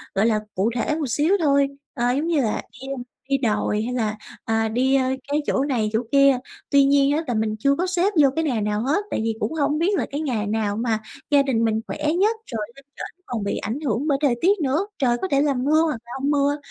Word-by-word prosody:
gọi 195 +3 +3
là, 220 -2 +2 0.2
cụ 195 +4 +1
thể 250 +5 0
một 310 -3 -2
xíu 300 - +2
thôi, 280 -1 +4 0.3
ờ, 245 +1 +1
giống 285 +6 -1
như 325 -4 +2
là 220 -4 -1 0.2
đi 265 - -8 0.4
đi 275 - +3
đồi 215 -4 0
hay 245 +2 -3
là, 215 -3 -1 0.3
à, 225 0 +1
đi, 260 +4 +2
ơ, 270 - +3 0.2
cái 290 +1 0
chỗ 270 - +1
này 245 -7 0
chỗ 220 - +2
kia. 275 -1 +5 0.3
Tuy 280 0 +5
nhiên 280 0 +4
á 325 - -1
là 245 - -1
mình 215 -1 0
chưa 275 +5 +3
có 360 - 0
xếp 370 +3 +1
vô 280 - +6
cái 325 - 0
nà 250 -8 0
nào 210 +1 -1
hết, 295 - +1
tại - - -1
vì 225 0 -1
cũng 310 - -2
hông 300 -1 0
biết 380 +4 +2
là - - 0
cái 285 +2 -3
ngày 235 -9 -1
nào 210 -1 -1
mà 225 -1 0 0.3
gia 285 -1 +5
đình 250 -5 0
mình 220 0 0
khỏe - - -5 0.2
nhất, 430 +4 +3 0.2
rồi 225 -2 -3
lên 275 0 -16
trển 365 - -8
còn 235 -4 -4
bị 200 - -2
ảnh 225 +7 -3
hưởng 275 -1 -1
bởi 280 -3 +2
thời 275 -5 +3
tiết 395 +3 +3
nữa, 300 +9 0
trời 245 -4 +2
có - - -1
thể 275 - +3
là 290 -1 +2
mưa 285 +5 +2
hoặc 310 -6 0
là 240 - -12
hông 280 +2 +1
mưa. 285 0 +2
275 Hz, 260 wpm, -23 LUFS, 225-295 Hz, 0.4 s, vô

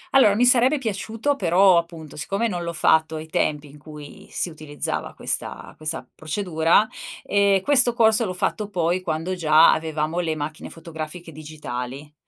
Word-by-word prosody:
Allora 210 -7 +6
mi 240 +4 +3
sarebbe 250 +4 +5
piaciuto, 225 +3 -2
però 185 -3 +4
appunto, 165 -3 -9
siccome 195 +9 -1
non 180 -5 -3
l'ho 170 0 -3
fatto 160 -1 +2
ai 155 0 -6
tempi 150 -1 -1
in 150 - -15
cui 150 -1 -12
si 175 - -3
utilizzava 155 -2 -5
questa - - -4
questa 155 +1 -4
procedura, 165 +3 +1 0.4
ehm, 200 -1 +2
questo 250 0 +3
corso 225 0 +4
l'ho 185 -4 -3
fatto 210 +3 -2
poi 175 -1 0
quando 165 +1 -3
già 160 -2 +5
avevamo 160 +1 -2
le 165 -3 -1
macchine 155 0 -6
fotografiche 165 +1 -8
digitali. 145 -2 -7
165 Hz, 155 wpm, -23 LUFS, 155-200 Hz, 0.4 s, Allora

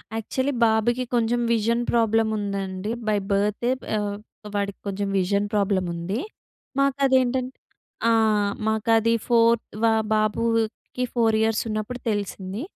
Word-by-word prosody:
Actually, 260 +5 -1
బాబుకి 230 +3 +2
కొంచెం 240 +1 +1
vision 230 +2 +1
problem 225 -1 +2
ఉందండి. 200 0 -3 0.2
బై 210 -1 +2
బర్తే, 210 +4 +1 0.3
ఆహ్, 205 -1 -2 0.4
వాడికి 200 -1 -2
కొంచెం 200 0 -2
విజన్ 200 +2 +1
ప్రాబ్లమ్ 195 -3 +1
ఉంది. 180 +6 -3 0.6
మాకు 275 -1 +2
అదేంటం 260 -1 +2 0.6
ఆ! - - +4 0.6
మాకు 220 +1 -1
అది 225 +1 +2
ఫోర్ 235 -1 +4 0.3
వా 225 - +5 0.2
బాబుకి 225 +3 0
4 225 -2 +3
ఇయర్స్ 220 -1 +2
ఉన్నప్పుడు 215 +3 -3
తెలిసింది. 200 0 -3
220 Hz, 120 wpm, -24 LUFS, 205-235 Hz, 0.6 s, వా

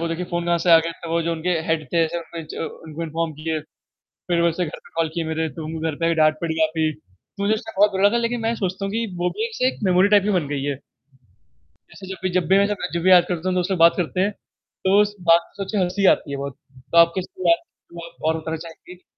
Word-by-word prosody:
वो 170 - -1
देखिए 165 +2 -3
फ़ोन 170 0 -1
कहाँ 170 0 +2
से - - +5
आ 165 - +9
गया 165 +1 -2
तो 165 - -5
वो 170 - +2
जो 170 +1 -1
उनके 165 +2 -2 0.2
हेड 160 -2 0
थे 165 -1 +3
जो 170 0 -6
च - - -8 0.3
उनको 160 +1 -6
इन्फॉर्म 165 0 -2
किए। 155 +1 -3 0.7
फिर 170 -1 +3
वैसे 170 +1 +1
घर 150 - -7
पे - - -20
कॉल 165 -1 +1
किए 170 -1 -2
मेरे 160 0 -1
तुम 160 +1 -5
घर 160 -2 -2
पे 165 - 0
हैं 165 0 +2
डांट 155 -1 +4
पड़ी 160 -1 -2
काफ़ी। 160 0 +1 0.5
मुझे 200 +2 +2
उस 215 - -2
टाइम 225 -3 -8
बहुत 210 0 +6
बुरा 195 0 -1
लगा 235 +3 +1
लेकिन 235 +1 -1
मैं 225 +1 0
सोचता 190 -1 -3
हूँ 195 - -3
कि 230 +1 0
वो 180 0 +1
भी 445 - 0
ऐसी 255 - 0
एक - - -2
मेमोरी 185 0 +4
टाइप 205 -2 +5
ही 210 - 0
बन 150 - -6
गई 140 -1 -3
है। 145 -1 -1 1.0
जैसे 190 - -15
जब 190 - -6
भी 185 - +1
जब 170 - -5
भी 190 +1 +5
मैं 200 0 +4 0.3
जब 170 - -1
भी 185 - +5
याद 175 -1 +7
करता 175 0 -2
हूँ 185 - -1
तो 180 - +2
उससे 190 +2 -1
बात 170 - +6
करते 180 +1 -2
हैं। 205 +2 +1
तो 195 0 -1
उस 205 0 -1
बात 170 +1 +7 0.2
को 195 - -2
सोच 190 - -7
के 215 - -1
अच्छी 190 - +3
हँसी 190 +3 -1
आती 145 - -12
है 140 - -3
बहुत। 140 -1 -6 0.3
तो 170 - +2
आप 170 0 +7
किसी 370 - -5
बात 335 0 +3 0.3
पे 170 -1 -7
और 160 0 +2
बताना 160 +1 -4
चाहेंगी? 170 +2 -12
170 Hz, 275 wpm, -22 LUFS, 160-195 Hz, 1.0 s, आ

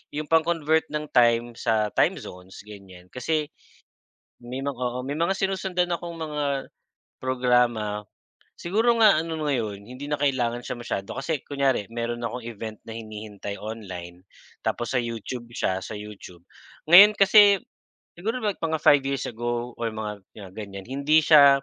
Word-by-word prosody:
yung 150 - -3
pang-convert 160 0 +2
ng 150 0 -3
time 120 0 +3
sa 110 -2 0
time - - +2
zones 90 +3 -11
ganyan. 95 -4 -13
Kasi 150 +4 -1 1.0
may 125 +2 -5
mga 140 -1 -3
oo, 125 0 -2
may 140 +3 -4
mga 170 +4 +1
sinusundan 190 -2 -1
akong 170 0 -7
mga 145 -3 -2 0.5
programa, 125 -5 +1 0.5
siguro 220 +7 +1
nga 210 -7 +7
ano 165 0 -2
ngayon 115 -9 -2
hindi 125 +6 -9
na 150 0 -3
kailangan 120 -4 0
siya 120 - -6
masyado 100 -4 -5
kasi 145 +1 -2
kunyari, 135 -7 0
meron 120 0 -4
akong 120 0 -4
event 110 -1 -7
na 110 - -7
hinihintay 105 -2 -7
online 95 -5 -8 0.4
tapos 120 +2 -2
sa 125 - +2
YouTube 115 +1 -6
siya, 95 0 0
sa 105 - -6
YouTube. 100 -4 -11 0.4
Ngayon 200 +6 +9
kasi 200 -1 +6 0.5
siguro 225 +6 -3
like 205 -3 -1
mga 160 -2 -2
5 140 -2 +5
years 135 -1 -1
ago, 120 +1 -3
or 115 - -2
mga 105 -1 -5 0.2
'yan 100 -3 -10
ganyan, 100 -1 -8
hindi 140 +4 +3
siya 140 -3 +7
125 Hz, 155 wpm, -25 LUFS, 110-155 Hz, 1.0 s, Ngayon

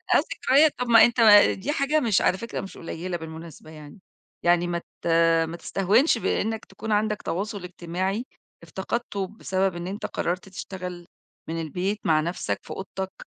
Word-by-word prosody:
آه، - - +8
ذكريات. 290 0 +2
طَب 250 - -1
ما 230 -1 +8
أنت 240 0 -1
ما 205 -2 +8
دي 255 +10 -3
حاجة 300 0 +1
مش 225 -8 +2
على 190 - +2
فكرة 230 - -5
مش 195 - -10
قليّلة 175 +2 -5
بالمناسبة 160 -1 -10
يعني، 150 +3 -12 0.4
يعني 175 0 +3
ما 170 0 -1
ت 170 - -11 0.4
ما 170 +1 -6
تستهونش 205 - +2
بإنك 220 0 -1
تكون 220 - -7
عَندك 210 0 +1
تواصُل 200 +2 -4
إجتماعي 185 +5 -3 0.4
افتقدته 195 +3 -3
بسبب 190 -3 -1
إن 175 +1 -5
أنت 200 +2 -5
قرّرت 180 +2 -3
تشتغل 180 -2 -7 0.4
من 165 0 -3
البيت 185 +7 -2
مع 155 -2 +4
نَفْسك 170 +3 -3
في - - -17
أوضتك. 190 0 -6
190 Hz, 165 wpm, -25 LUFS, 175-220 Hz, 0.4 s, آه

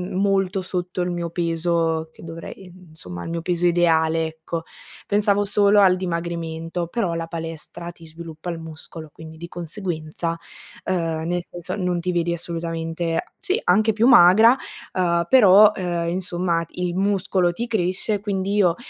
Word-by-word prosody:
molto 195 -1 +1
sotto 180 0 -3
il 180 - -1
mio 170 -1 -3
peso 165 -1 0
che - - -16
dovrei, 165 +3 -9 0.2
insomma 90 - -9
il - - -5
mio 170 0 -3
peso 175 0 -1
ideale 165 -2 +3
ecco. 160 +1 -6 0.4
Pensavo 205 0 +2
solo 205 0 +4
al 185 -2 +6
dimagrimento, 170 -1 -3
però 175 -2 -2
la 165 0 -3
palestra 165 +1 -7
ti 165 -1 -16
sviluppa 160 +1 -8
il 165 - -6
muscolo, 160 0 -10
quindi 160 0 -11
di 170 +1 -8
conseguenza, 165 -2 -4 0.5
ehm, 165 -3 -1
nel 175 0 -1
senso 175 +1 -6
non 180 -3 -1
ti 180 +1 -2
vedi 170 0 0
assolutamente, 165 -1 -3 0.2
sì, 395 -1 0
anche 215 +4 +3
più 225 +3 +2
magra, 225 +1 +7 0.4
ehm, 170 -2 +1
però, 210 -2 +7
ehm, 175 -2 -2
insomma 175 -1 -1
il 180 -1 -3
muscolo 190 -2 +1
ti 230 +7 -4
cresce 195 -2 -1
e 205 - -3
quindi 195 -1 -2
io, 185 -5 +3
175 Hz, 155 wpm, -22 LUFS, 165-190 Hz, 0.5 s, magra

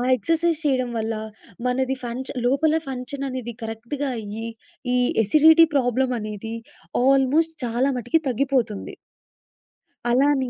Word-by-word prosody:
Exercise 330 +7 +1
చేయడం 255 -3 +1
వల్ల 225 0 -1 0.5
మనది 260 +1 0
ఫంక్ష 245 +2 -5
లోపల 300 +5 +3
ఫంక్షన్ 270 +1 -5
అనేది 250 -2 -5
కరెక్ట్‌గా 235 +6 -4
అయ్యి 220 +2 -6 0.5
ఈ - - +3 0.3
ఎసిడిటీ 315 +9 +7
ప్రాబ్లమ్ 255 -1 +2
అనేది 215 +1 -5 0.5
ఆల్మోస్ట్ 275 +5 +3
చాలా 240 +3 +1
మటికి 245 +7 +1
తగ్గిపోతుంది. 245 -4 -1 1.1
అలానే 265 +1 +3
255 Hz, 110 wpm, -23 LUFS, 235-280 Hz, 1.1 s, ఎసిడిటీ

